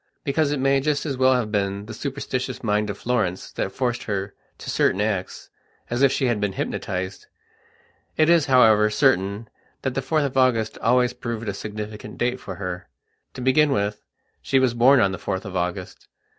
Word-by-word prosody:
Because 145 Hz, +1 st, +1 dB
it 145 Hz, -, -1 dB
may 135 Hz, +1 st, +3 dB
just 145 Hz, +2 st, -1 dB
as 140 Hz, -3 st, -2 dB
well 130 Hz, 0 st, +4 dB
have 115 Hz, -4 st, -1 dB
been 100 Hz, -1 st, -1 dB
the 110 Hz, -, -8 dB
superstitious 130 Hz, 0 st, -4 dB
mind 105 Hz, -1 st, +1 dB
of 100 Hz, -, -4 dB
Florence 110 Hz, -8 st, -1 dB
that 95 Hz, -, -3 dB
forced 125 Hz, 0 st, -2 dB
her 100 Hz, -1 st, -3 dB, 0.2 s
to -, -, -11 dB
certain 95 Hz, -, +2 dB
acts, 105 Hz, -3 st, -3 dB, 0.4 s
as 120 Hz, +2 st, -1 dB
if 140 Hz, -1 st, +5 dB
she 135 Hz, -, 0 dB
had 120 Hz, -4 st, 0 dB
been 100 Hz, -2 st, -1 dB
hypnotized. 95 Hz, 0 st, -4 dB, 0.9 s
It 155 Hz, -, +4 dB
is, 170 Hz, -3 st, +4 dB
however, 110 Hz, -5 st, +5 dB
certain 105 Hz, -3 st, +1 dB, 0.4 s
that 130 Hz, -, -1 dB
the 135 Hz, -, -1 dB
4th 145 Hz, +3 st, +1 dB
of 135 Hz, -1 st, -3 dB
August 120 Hz, -4 st, +2 dB
always 125 Hz, +1 st, +2 dB
proved 115 Hz, -2 st, -5 dB
a 100 Hz, -, -1 dB
significant 105 Hz, +1 st, -7 dB
date 125 Hz, +1 st, 0 dB
for 95 Hz, -, -7 dB
her. 90 Hz, -1 st, -6 dB, 0.5 s
To 130 Hz, -, -6 dB
begin 130 Hz, +4 st, +4 dB
with, 105 Hz, -4 st, -1 dB, 0.4 s
she 135 Hz, -, +1 dB
was 130 Hz, -3 st, +3 dB
born 130 Hz, +3 st, +5 dB
on 100 Hz, -4 st, +3 dB
the 95 Hz, -, -5 dB
4th 95 Hz, +3 st, -3 dB
of 95 Hz, -1 st, -7 dB
August. 90 Hz, 0 st, -4 dB
115 Hz, 190 wpm, -23 LUFS, 100-130 Hz, 0.9 s, if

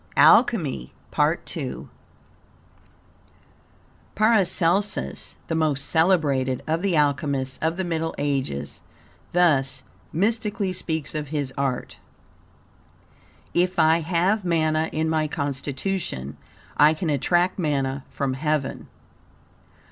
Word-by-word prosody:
ALCHEMY 170 Hz, -, +4 dB, 0.2 s
PART -, -, 0 dB
II -, -, -5 dB, 2.3 s
Paracelsus, 195 Hz, -, +1 dB
the -, -, -3 dB
most 155 Hz, -4 st, +1 dB
celebrated 150 Hz, -7 st, +2 dB
of 160 Hz, +2 st, -1 dB
the 195 Hz, -3 st, +1 dB
alchemists 140 Hz, -2 st, 0 dB
of 160 Hz, +2 st, 0 dB
the 190 Hz, -, -1 dB
Middle 165 Hz, -2 st, -2 dB
Ages, 135 Hz, -, -2 dB, 0.5 s
thus 135 Hz, -7 st, +2 dB, 0.3 s
mystically 205 Hz, +1 st, 0 dB
speaks 160 Hz, -4 st, -3 dB
of 150 Hz, -1 st, -3 dB
his 140 Hz, -2 st, -3 dB
art: 135 Hz, -2 st, -3 dB, 1.5 s
"If 180 Hz, +1 st, +1 dB
I 160 Hz, 0 st, +4 dB
have 180 Hz, +5 st, +1 dB
manna 160 Hz, -2 st, +1 dB
in 160 Hz, +1 st, -1 dB
my 160 Hz, -1 st, +1 dB
constitution, 140 Hz, -, -3 dB, 0.4 s
I 150 Hz, +2 st, +6 dB
can 160 Hz, 0 st, -2 dB
attract 175 Hz, +7 st, +1 dB
manna 140 Hz, -4 st, -1 dB
from 135 Hz, -2 st, -2 dB
heaven. 150 Hz, 0 st, -2 dB
155 Hz, 100 wpm, -24 LUFS, 140-175 Hz, 2.3 s, I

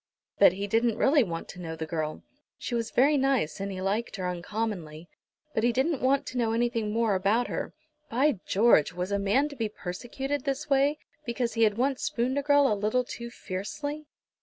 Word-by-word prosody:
But 195 Hz, -3 st, +7 dB
he 200 Hz, +2 st, -3 dB
didn't 225 Hz, +2 st, +1 dB
really 285 Hz, +1 st, +4 dB
want 165 Hz, -5 st, -5 dB
to 180 Hz, -, -9 dB
know 165 Hz, -2 st, -5 dB
the 160 Hz, 0 st, -4 dB
girl. 155 Hz, -1 st, -3 dB, 0.3 s
She -, -, -5 dB
was 230 Hz, -1 st, -1 dB
very 285 Hz, +4 st, +4 dB
nice, 265 Hz, -, +1 dB
and 195 Hz, 0 st, -3 dB
he 185 Hz, -1 st, -5 dB
liked 210 Hz, +5 st, -1 dB
her 185 Hz, -3 st, -3 dB
uncommonly, 180 Hz, -3 st, -4 dB, 0.5 s
but 220 Hz, -, 0 dB
he 240 Hz, -, +4 dB
didn't 265 Hz, +4 st, 0 dB
want 265 Hz, +2 st, +2 dB
to 250 Hz, -, -4 dB
know 225 Hz, -2 st, +1 dB
anything 230 Hz, -2 st, 0 dB
more 225 Hz, -1 st, +1 dB
about 200 Hz, +6 st, +1 dB
her. -, -, -4 dB, 0.3 s
By 260 Hz, -1 st, +2 dB
George! 205 Hz, -7 st, +4 dB
Was 180 Hz, +3 st, -3 dB
a 200 Hz, -, +1 dB
man 210 Hz, +9 st, +2 dB
to 285 Hz, -, -9 dB
be 225 Hz, -4 st, -2 dB
persecuted 250 Hz, +9 st, -4 dB
this 275 Hz, +2 st, -2 dB
way, 280 Hz, +1 st, +3 dB, 0.3 s
because 235 Hz, -1 st, -2 dB
he 230 Hz, -, -1 dB
had 210 Hz, -1 st, +1 dB
once 265 Hz, +2 st, 0 dB
spooned 270 Hz, -3 st, 0 dB
a -, -, -1 dB
girl 285 Hz, 0 st, +4 dB
a 225 Hz, -, +3 dB
little 215 Hz, +5 st, +1 dB
too 235 Hz, -1 st, -7 dB
fiercely? 285 Hz, +10 st, -5 dB
230 Hz, 205 wpm, -28 LUFS, 195-270 Hz, 0.5 s, But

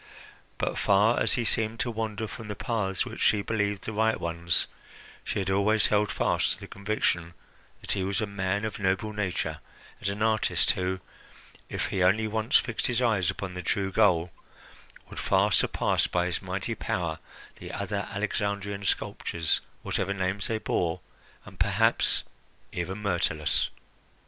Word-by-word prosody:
But, -, -, -1 dB
far 105 Hz, +4 st, +4 dB
as -, -, +2 dB
he 120 Hz, -, +1 dB
seemed 110 Hz, +1 st, 0 dB
to 120 Hz, -, 0 dB
wander 110 Hz, -1 st, -3 dB
from 110 Hz, 0 st, -8 dB
the 105 Hz, -, -4 dB
paths 105 Hz, -4 st, -1 dB
which -, -, -7 dB
she 105 Hz, -2 st, +4 dB
believed 105 Hz, -2 st, -1 dB
the 110 Hz, -, -4 dB
right 110 Hz, +1 st, +2 dB
ones, 85 Hz, 0 st, +2 dB, 0.6 s
she -, -, -3 dB
had 95 Hz, -1 st, 0 dB
always 105 Hz, +2 st, +3 dB
held 105 Hz, 0 st, +3 dB
fast -, -, +1 dB
to -, -, -7 dB
the -, -, -9 dB
conviction 100 Hz, -4 st, -1 dB, 0.5 s
that -, -, -4 dB
he 95 Hz, -, 0 dB
was 95 Hz, +2 st, 0 dB
a 110 Hz, -, +1 dB
man 100 Hz, 0 st, -1 dB
of 110 Hz, -, -4 dB
noble 100 Hz, +2 st, 0 dB
nature, 100 Hz, -4 st, -2 dB, 0.4 s
and 100 Hz, -, -1 dB
an 100 Hz, +2 st, -2 dB
artist 110 Hz, -1 st, +3 dB
who, 95 Hz, 0 st, -2 dB, 0.7 s
if -, -, -2 dB
he 95 Hz, -, +1 dB
only 100 Hz, +5 st, +4 dB
once 110 Hz, +4 st, +3 dB
fixed 120 Hz, -3 st, -1 dB
his 125 Hz, -1 st, +1 dB
eyes 110 Hz, -8 st, +2 dB
upon 95 Hz, -2 st, -3 dB
the 90 Hz, -, -4 dB
true 95 Hz, +2 st, 0 dB
goal, 90 Hz, -5 st, +3 dB, 0.8 s
would -, -, -7 dB
far -, -, +3 dB
surpass -, -, +2 dB
by 90 Hz, 0 st, +1 dB
his 90 Hz, -1 st, -2 dB
mighty 95 Hz, +4 st, -3 dB
power 85 Hz, -6 st, -2 dB, 0.4 s
the -, -, -8 dB
other -, -, -3 dB
Alexandrian 100 Hz, 0 st, -2 dB
sculptors, 85 Hz, -4 st, 0 dB, 0.2 s
whatever 100 Hz, +1 st, -1 dB
names 95 Hz, +1 st, -1 dB
they 110 Hz, -, 0 dB
bore, 90 Hz, -5 st, 0 dB, 0.5 s
and -, -, -13 dB
perhaps -, -, +3 dB, 0.5 s
even 95 Hz, +3 st, -3 dB
Myrtilus. 85 Hz, -5 st, +1 dB
100 Hz, 165 wpm, -28 LUFS, 95-110 Hz, 0.8 s, far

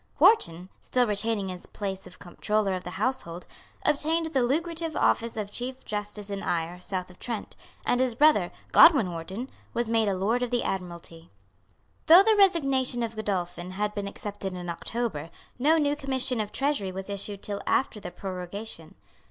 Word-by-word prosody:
Wharton, 180 Hz, -, +4 dB
still 250 Hz, -1 st, +1 dB
retaining 210 Hz, -2 st, 0 dB
his 180 Hz, -1 st, -7 dB
place 195 Hz, -2 st, -5 dB
of 180 Hz, -, -13 dB
Comptroller 205 Hz, +3 st, -1 dB
of 185 Hz, -1 st, -3 dB
the 180 Hz, +1 st, -6 dB
Household, 195 Hz, -7 st, -2 dB, 0.4 s
obtained 320 Hz, +2 st, +1 dB
the 265 Hz, -, +3 dB
lucrative 325 Hz, +5 st, -1 dB
office 230 Hz, -1 st, +1 dB
of 205 Hz, -1 st, -3 dB
Chief 255 Hz, +4 st, -5 dB
Justice 205 Hz, -1 st, -4 dB
in 200 Hz, 0 st, -3 dB
Eyre, 170 Hz, +1 st, -2 dB
South 185 Hz, -1 st, -2 dB
of 180 Hz, -, -19 dB
Trent; 230 Hz, -4 st, -5 dB, 0.3 s
and 245 Hz, -, +2 dB
his 255 Hz, -3 st, +1 dB
brother, 265 Hz, -, +4 dB, 0.2 s
Godwin 275 Hz, -, +7 dB
Wharton, 185 Hz, +9 st, -5 dB, 0.3 s
was 235 Hz, -1 st, 0 dB
made 225 Hz, -2 st, +3 dB
a 195 Hz, -, +1 dB
Lord 220 Hz, +6 st, +1 dB
of 245 Hz, -, 0 dB
the 245 Hz, 0 st, 0 dB
Admiralty. 170 Hz, -3 st, -5 dB, 0.8 s
Though 345 Hz, +4 st, +10 dB
the 440 Hz, +1 st, +4 dB
resignation 275 Hz, -, +3 dB
of 230 Hz, 0 st, -4 dB
Godolphin 180 Hz, -4 st, -3 dB
had 210 Hz, +2 st, -1 dB
been 205 Hz, -1 st, -3 dB
accepted 200 Hz, -1 st, -5 dB
in 180 Hz, -1 st, -6 dB
October, 170 Hz, -4 st, -3 dB, 0.3 s
no 305 Hz, +5 st, +4 dB
new 290 Hz, -2 st, +2 dB
commission 260 Hz, -4 st, -1 dB
of 210 Hz, -1 st, -5 dB
Treasury 270 Hz, -9 st, 0 dB
was 190 Hz, +1 st, -6 dB
issued 200 Hz, 0 st, -5 dB
till 200 Hz, -1 st, -3 dB
after 255 Hz, -5 st, +1 dB
the 180 Hz, -, -6 dB
prorogation. 185 Hz, 0 st, -6 dB
210 Hz, 170 wpm, -27 LUFS, 185-255 Hz, 0.8 s, Though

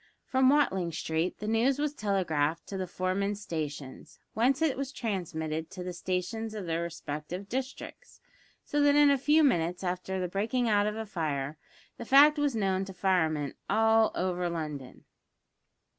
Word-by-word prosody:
From 260 Hz, 0 st, +3 dB
Watling 190 Hz, -, +2 dB
Street 160 Hz, +2 st, -2 dB
the 210 Hz, -, -6 dB
news 235 Hz, +5 st, +2 dB
was 295 Hz, 0 st, -1 dB
telegraphed 165 Hz, -, 0 dB
to 200 Hz, -, -5 dB
the 190 Hz, -1 st, -3 dB
foremen's 195 Hz, +3 st, -1 dB
stations, 150 Hz, -8 st, -6 dB, 0.2 s
whence 250 Hz, +5 st, +2 dB
it 320 Hz, -4 st, +2 dB
was 275 Hz, 0 st, -4 dB
transmitted 160 Hz, -, -3 dB
to 180 Hz, -1 st, -7 dB
the 180 Hz, 0 st, -5 dB
stations 190 Hz, +5 st, -3 dB
of 205 Hz, -3 st, -5 dB
their 165 Hz, 0 st, -1 dB
respective 170 Hz, +2 st, -5 dB
districts, 260 Hz, +4 st, -6 dB, 0.5 s
so 295 Hz, -, 0 dB
that 290 Hz, 0 st, +5 dB
in 290 Hz, -1 st, +6 dB
a 280 Hz, -, +3 dB
few 300 Hz, +4 st, +4 dB
minutes 180 Hz, -, +1 dB
after 185 Hz, +1 st, -2 dB
the 180 Hz, -, -1 dB
breaking 225 Hz, +7 st, -1 dB
out 205 Hz, -1 st, +3 dB
of 210 Hz, -, -2 dB
a 220 Hz, 0 st, -4 dB
fire 150 Hz, -6 st, -3 dB, 0.4 s
the 235 Hz, -, -7 dB
fact 290 Hz, +4 st, +6 dB
was 290 Hz, -4 st, +1 dB
known 195 Hz, -3 st, 0 dB
to 190 Hz, -, -9 dB
the -, -, -28 dB
firemen 160 Hz, -6 st, +1 dB, 0.2 s
all 220 Hz, +1 st, +4 dB
over 180 Hz, -1 st, -1 dB
London. 150 Hz, -6 st, -6 dB
190 Hz, 170 wpm, -29 LUFS, 170-235 Hz, 0.5 s, in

